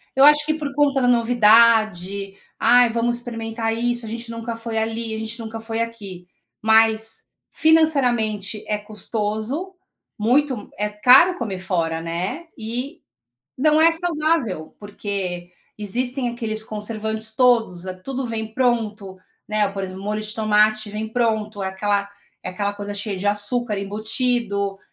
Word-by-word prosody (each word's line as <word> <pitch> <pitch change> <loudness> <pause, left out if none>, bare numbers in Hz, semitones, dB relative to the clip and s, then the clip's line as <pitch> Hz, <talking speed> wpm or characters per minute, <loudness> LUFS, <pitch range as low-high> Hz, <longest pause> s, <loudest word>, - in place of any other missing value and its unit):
eu 270 - +5
acho 295 +1 +7
que 310 - +1
por 295 -3 -5
conta 280 -1 +2
da 250 - +2
novidade. 220 -5 +4 0.3
"Ai, 245 -1 +5
vamos 235 +1 0
experimentar 225 -1 -3
isso, 240 0 -1
a - - -7
gente 230 +1 -6
nunca 230 0 -5
foi 230 0 -5
ali, 225 0 -2
a 220 - -4
gente 220 +1 -5
nunca 225 0 -6
foi 225 0 -3
aqui." 200 -6 -6 0.4
Mas 220 0 +3 0.3
financeiramente 245 -10 +2
é 210 - +1
custoso, 215 - -3 0.4
muito 250 0 +1
é 210 - +1
caro 255 - +6
comer 205 -6 -4
fora, 165 -3 -1
né, 180 - -4
e 245 +8 -5 0.6
não 305 +3 +4
é 330 +1 +7
saudável, 310 - -1
porque 195 -4 -5 0.3
existem 245 +5 -1
aqueles 220 -2 -3
conservantes 220 +1 -4
todos, 230 -8 +3 0.2
tudo 270 -1 -3
vem 220 -1 -5
pronto, 220 -6 -1 0.3
né, 215 -1 +1
por 195 0 -4
exemplo, 190 0 -6
molho 215 +1 -2
de 215 0 -2
tomate 215 0 +2
vem 215 +1 -4
pronto, 220 -3 -1
aquela 200 +1 -1 0.4
aquela 200 +2 -2
coisa 205 0 -6
cheia 205 -1 -2
de 200 - -3
açúcar 210 +2 +1
embutido, 205 -1 -1
220 Hz, 140 wpm, -22 LUFS, 205-245 Hz, 0.6 s, acho